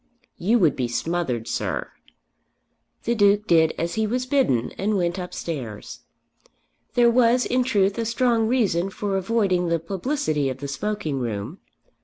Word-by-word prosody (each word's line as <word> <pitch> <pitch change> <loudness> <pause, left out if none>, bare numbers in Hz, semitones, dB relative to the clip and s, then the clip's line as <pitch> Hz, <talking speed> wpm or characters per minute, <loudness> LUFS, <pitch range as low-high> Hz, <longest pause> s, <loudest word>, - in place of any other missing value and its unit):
"You 215 +7 +3
would 165 - +3
be 125 -2 -1
smothered, 125 -3 -2
sir." - - -3 1.1
The 235 - +1
Duke 205 -1 +3
did 160 -4 +3
as 170 +1 -2
he 220 -1 0
was 250 +3 -1
bidden 255 - +1
and 205 +1 -1
went 175 0 -1
upstairs. 145 - -6 1.0
There 240 -1 +5
was 245 +1 +4
in 250 0 +1
truth 200 -4 +1
a 230 - -1
strong 235 -1 +1
reason 200 -7 +1
for 200 0 -3
avoiding 190 -3 +1
the 170 - +2
publicity 165 - -1
of 130 - -4
the 140 +1 -6
smoking 155 -1 -3
room. 115 - -4
195 Hz, 150 wpm, -23 LUFS, 160-230 Hz, 1.1 s, There